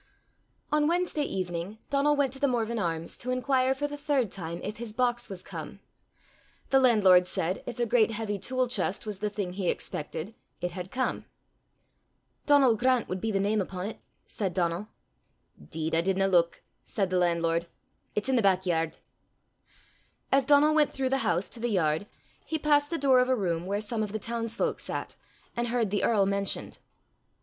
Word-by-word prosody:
On 300 Hz, 0 st, +3 dB
Wednesday 345 Hz, -2 st, 0 dB
evening 185 Hz, -4 st, -3 dB
Donal 285 Hz, +1 st, +3 dB
went 280 Hz, -3 st, +1 dB
to 270 Hz, -, -8 dB
The 285 Hz, -, +3 dB
Morven 235 Hz, -2 st, 0 dB
Arms 165 Hz, -3 st, -2 dB
to 250 Hz, -, -4 dB
inquire 255 Hz, +1 st, +2 dB
for 290 Hz, +2 st, -2 dB
the 290 Hz, 0 st, -6 dB
third 280 Hz, -8 st, 0 dB
time 170 Hz, -2 st, -5 dB
if 210 Hz, +1 st, -4 dB
his 225 Hz, -2 st, -6 dB
box 240 Hz, 0 st, 0 dB
was 185 Hz, -2 st, -7 dB
come. -, -, -8 dB, 0.9 s
The 270 Hz, -, +6 dB
landlord 195 Hz, -8 st, +6 dB
said, 180 Hz, +2 st, -1 dB
if 240 Hz, -, -5 dB
a 240 Hz, -, +1 dB
great 230 Hz, -1 st, +3 dB
heavy 215 Hz, -2 st, -3 dB
tool 255 Hz, +4 st, 0 dB
chest 200 Hz, -4 st, -1 dB
was 210 Hz, -3 st, -4 dB
the 210 Hz, +1 st, -1 dB
thing 200 Hz, -3 st, -4 dB
he 185 Hz, -2 st, -1 dB
expected, 160 Hz, +7 st, -4 dB, 0.3 s
it 180 Hz, -, -2 dB
had 180 Hz, +1 st, -6 dB
come. 255 Hz, +4 st, -2 dB, 1.2 s
"Donal 275 Hz, -5 st, +6 dB
Grant 255 Hz, +1 st, +2 dB
wad 185 Hz, 0 st, -3 dB
be 225 Hz, -, -1 dB
the 195 Hz, -, +1 dB
name 205 Hz, +2 st, +1 dB
upo' 190 Hz, +2 st, -4 dB
't," -, -, -15 dB, 0.3 s
said 190 Hz, -5 st, -3 dB
Donal. 175 Hz, +2 st, 0 dB, 0.8 s
"'Deed, 160 Hz, 0 st, -3 dB
I 165 Hz, -, +4 dB
didna 195 Hz, +2 st, +1 dB
luik," 175 Hz, -3 st, +2 dB, 0.2 s
said 195 Hz, -3 st, -2 dB
the 185 Hz, -, +2 dB
landlord. 170 Hz, -1 st, +1 dB, 0.5 s
"It's 210 Hz, +4 st, 0 dB
i' 265 Hz, -, +2 dB
the 240 Hz, -, +4 dB
back 190 Hz, -2 st, +3 dB
yard." 165 Hz, -2 st, 0 dB, 1.3 s
As 275 Hz, -1 st, +4 dB
Donal 295 Hz, +2 st, +5 dB
went 300 Hz, -2 st, +3 dB
through 265 Hz, -1 st, -1 dB
the 270 Hz, +1 st, +1 dB
house 185 Hz, -4 st, 0 dB
to 235 Hz, -, -8 dB
the 240 Hz, +1 st, -1 dB
yard, 170 Hz, -2 st, +1 dB, 0.4 s
he 320 Hz, -, -2 dB
passed 290 Hz, -1 st, +3 dB
the 335 Hz, -, -1 dB
door 265 Hz, -3 st, +4 dB
of 250 Hz, 0 st, +2 dB
a 260 Hz, -, +4 dB
room 175 Hz, -5 st, -1 dB
where 200 Hz, +1 st, 0 dB
some 220 Hz, +1 st, -3 dB
of 210 Hz, -1 st, -3 dB
the -, -, 0 dB
townsfolk 230 Hz, +1 st, -2 dB
sat, -, -, -5 dB, 0.4 s
and 240 Hz, 0 st, -1 dB
heard 230 Hz, -4 st, 0 dB
the 205 Hz, -, 0 dB
earl 210 Hz, -4 st, +3 dB
mentioned. 200 Hz, 0 st, -1 dB
215 Hz, 190 wpm, -28 LUFS, 185-255 Hz, 1.3 s, The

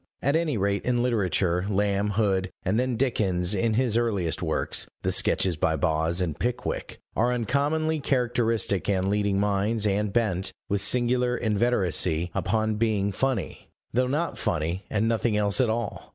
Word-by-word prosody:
At 140 Hz, +3 st, +1 dB
any 160 Hz, -6 st, 0 dB
rate, 100 Hz, 0 st, 0 dB
in 120 Hz, -1 st, +1 dB
literature, 95 Hz, -6 st, 0 dB
Lamb, 100 Hz, 0 st, +1 dB
Hood, 95 Hz, -4 st, +1 dB, 0.2 s
and 100 Hz, +5 st, +1 dB
then 125 Hz, -1 st, 0 dB
Dickens 100 Hz, -7 st, 0 dB
in 110 Hz, +3 st, +1 dB
his 120 Hz, -2 st, +1 dB
earliest 100 Hz, -8 st, 0 dB
works, -, -, -1 dB, 0.2 s
the -, -, +1 dB
Sketches 90 Hz, -4 st, +2 dB
by 80 Hz, +1 st, +1 dB
Boz 80 Hz, +3 st, 0 dB
and 80 Hz, -5 st, -2 dB
Pickwick, 120 Hz, 0 st, -3 dB, 0.2 s
are 120 Hz, +2 st, +2 dB
uncommonly 145 Hz, +6 st, 0 dB
characteristic 115 Hz, -, 0 dB
and 95 Hz, 0 st, +1 dB
leading 100 Hz, -1 st, +1 dB
minds, 105 Hz, +2 st, 0 dB
and 105 Hz, 0 st, 0 dB
bent, 95 Hz, -5 st, 0 dB
with 100 Hz, 0 st, 0 dB
singular 125 Hz, +3 st, +2 dB
inveteracy, 95 Hz, -7 st, +1 dB
upon 110 Hz, +1 st, 0 dB
being 105 Hz, -3 st, +1 dB
"funny," 130 Hz, +1 st, -2 dB, 0.2 s
though 125 Hz, +2 st, +2 dB
not 150 Hz, +6 st, -2 dB
funny 85 Hz, +5 st, -1 dB
and 110 Hz, +1 st, 0 dB
nothing 115 Hz, -1 st, +1 dB
else 105 Hz, +3 st, +2 dB
at 125 Hz, -, +2 dB
all. 110 Hz, -2 st, -3 dB
105 Hz, 155 wpm, -26 LUFS, 95-120 Hz, 0.2 s, Sketches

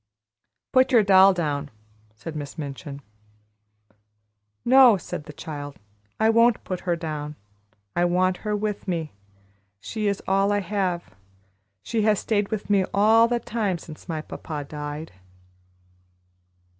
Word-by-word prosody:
"Put 260 Hz, +1 st, +4 dB
your 235 Hz, -4 st, +6 dB
doll 195 Hz, 0 st, +7 dB
down!" 150 Hz, -5 st, -2 dB, 0.5 s
said 155 Hz, +9 st, -8 dB
Miss 145 Hz, +1 st, -6 dB
Minchin. 140 Hz, -1 st, -7 dB, 1.6 s
"No," 255 Hz, -3 st, +7 dB
said 150 Hz, -3 st, -7 dB
the -, -, -9 dB
child, 145 Hz, -1 st, -7 dB, 0.4 s
"I 220 Hz, -, +4 dB
won't 230 Hz, +1 st, +4 dB
put 185 Hz, -1 st, -4 dB
her 175 Hz, -1 st, -1 dB
down; 155 Hz, -3 st, -5 dB, 0.6 s
I 175 Hz, -, +3 dB
want 180 Hz, +1 st, +2 dB
her 210 Hz, +1 st, -2 dB
with 210 Hz, -1 st, -3 dB
me. 165 Hz, -4 st, -2 dB, 0.7 s
She 215 Hz, -, -3 dB
is 200 Hz, -1 st, -1 dB
all 195 Hz, +1 st, +2 dB
I 205 Hz, 0 st, +1 dB
have. 185 Hz, -, -2 dB, 0.7 s
She 230 Hz, -2 st, -1 dB
has 210 Hz, -1 st, +3 dB
stayed 205 Hz, -1 st, 0 dB
with 215 Hz, -2 st, -4 dB
me 200 Hz, -2 st, +3 dB
all 220 Hz, +3 st, +5 dB
the 240 Hz, 0 st, 0 dB
time 210 Hz, -5 st, -2 dB
since 160 Hz, +1 st, -12 dB
my 160 Hz, -2 st, -2 dB
papa 150 Hz, -2 st, -6 dB
died." 150 Hz, +1 st, -6 dB
185 Hz, 135 wpm, -24 LUFS, 155-210 Hz, 1.6 s, doll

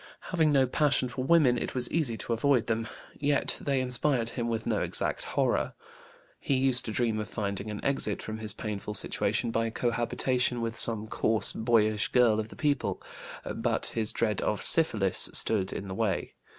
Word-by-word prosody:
Having 160 Hz, -3 st, +3 dB
no 135 Hz, -2 st, +4 dB
passion 130 Hz, -1 st, +1 dB
for 125 Hz, +2 st, -4 dB
women, 135 Hz, -5 st, +4 dB
it -, -, -4 dB
was 125 Hz, -1 st, +1 dB
easy 140 Hz, -9 st, 0 dB
to 115 Hz, -, -3 dB
avoid 125 Hz, +1 st, +2 dB
them. 115 Hz, 0 st, -1 dB, 0.3 s
Yet 145 Hz, 0 st, +1 dB
they 140 Hz, -2 st, 0 dB
inspired 125 Hz, -1 st, 0 dB
him 120 Hz, -1 st, -3 dB
with 115 Hz, -1 st, -2 dB
no -, -, 0 dB
exact -, -, -1 dB
horror. -, -, 0 dB, 0.6 s
He 140 Hz, -, 0 dB
used 130 Hz, -1 st, +4 dB
to 110 Hz, -, -3 dB
dream 110 Hz, -1 st, 0 dB
of 105 Hz, -, -5 dB
finding 100 Hz, -1 st, -3 dB
an 105 Hz, -1 st, -6 dB
exit 135 Hz, -7 st, -1 dB
from 110 Hz, 0 st, -6 dB
his 110 Hz, -1 st, -1 dB
painful 105 Hz, 0 st, -5 dB
situation 115 Hz, +3 st, +1 dB
by 115 Hz, 0 st, 0 dB
cohabitation 120 Hz, +2 st, 0 dB
with 115 Hz, -1 st, -3 dB
some 110 Hz, -2 st, -1 dB
coarse, 110 Hz, 0 st, 0 dB
boyish 110 Hz, -2 st, +2 dB
girl 120 Hz, -3 st, +3 dB
of 110 Hz, 0 st, -4 dB
the -, -, -12 dB
people; 145 Hz, -3 st, -1 dB, 0.5 s
but 115 Hz, -1 st, -1 dB
his 110 Hz, -2 st, -1 dB
dread 105 Hz, -3 st, -1 dB
of 105 Hz, -, -1 dB
syphilis 110 Hz, -, +2 dB
stood 95 Hz, -4 st, +2 dB
in 100 Hz, -, -5 dB
the 95 Hz, -, -5 dB
way. 100 Hz, -3 st, -1 dB
115 Hz, 180 wpm, -28 LUFS, 110-130 Hz, 0.6 s, no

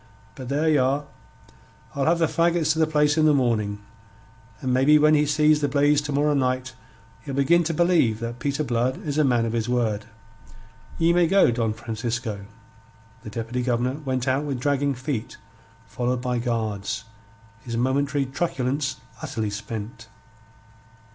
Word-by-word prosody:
But 130 Hz, -2 st, -8 dB
there 150 Hz, +3 st, 0 dB
ye 155 Hz, -2 st, +4 dB
are! 135 Hz, +3 st, +1 dB, 0.9 s
I'll 140 Hz, -1 st, -1 dB
have 170 Hz, +1 st, +3 dB
the 165 Hz, -, +2 dB
faggots 165 Hz, -1 st, +1 dB
to 160 Hz, -, -4 dB
the 160 Hz, -, +3 dB
place 150 Hz, 0 st, +2 dB
in 155 Hz, -, +4 dB
the 150 Hz, -, +4 dB
morning, 105 Hz, -6 st, 0 dB, 0.8 s
and 130 Hz, -1 st, -1 dB
maybe 135 Hz, +4 st, +5 dB
when 150 Hz, +1 st, +4 dB
he 150 Hz, -1 st, +3 dB
sees 150 Hz, 0 st, +3 dB
the 145 Hz, -, +2 dB
blaze 145 Hz, +1 st, +3 dB
to 145 Hz, 0 st, -5 dB
morrow 145 Hz, +1 st, +2 dB
night 130 Hz, -1 st, -1 dB, 0.5 s
he'll 140 Hz, -3 st, -6 dB
begin 170 Hz, +5 st, +3 dB
to 165 Hz, -, -1 dB
believe 165 Hz, -11 st, +2 dB
that 115 Hz, +1 st, -5 dB
Peter 140 Hz, +3 st, -1 dB
Blood 125 Hz, 0 st, -1 dB
is 150 Hz, 0 st, -1 dB
a -, -, +5 dB
man 120 Hz, -4 st, +2 dB
of 115 Hz, -, -3 dB
his 115 Hz, 0 st, -1 dB
word. 110 Hz, -4 st, 0 dB, 0.9 s
Ye 165 Hz, +1 st, +3 dB
may 175 Hz, -1 st, +3 dB
go, 195 Hz, -7 st, +4 dB
Don 115 Hz, -2 st, 0 dB
Francisco." 115 Hz, -2 st, -4 dB, 0.7 s
The -, -, -8 dB
Deputy 115 Hz, +3 st, -4 dB
Governor 125 Hz, +3 st, -1 dB
went 130 Hz, -3 st, -3 dB
out 135 Hz, +2 st, +1 dB
with 140 Hz, -4 st, -3 dB
dragging 140 Hz, +1 st, 0 dB
feet, 130 Hz, -2 st, -4 dB, 0.5 s
followed 125 Hz, 0 st, -2 dB
by 125 Hz, -1 st, -1 dB
guards, 110 Hz, -4 st, -2 dB, 0.6 s
his 115 Hz, 0 st, -5 dB
momentary 140 Hz, +3 st, 0 dB
truculence 135 Hz, -1 st, -2 dB, 0.3 s
utterly 110 Hz, -2 st, -3 dB
spent. 105 Hz, +2 st, -7 dB
130 Hz, 165 wpm, -24 LUFS, 120-150 Hz, 0.9 s, maybe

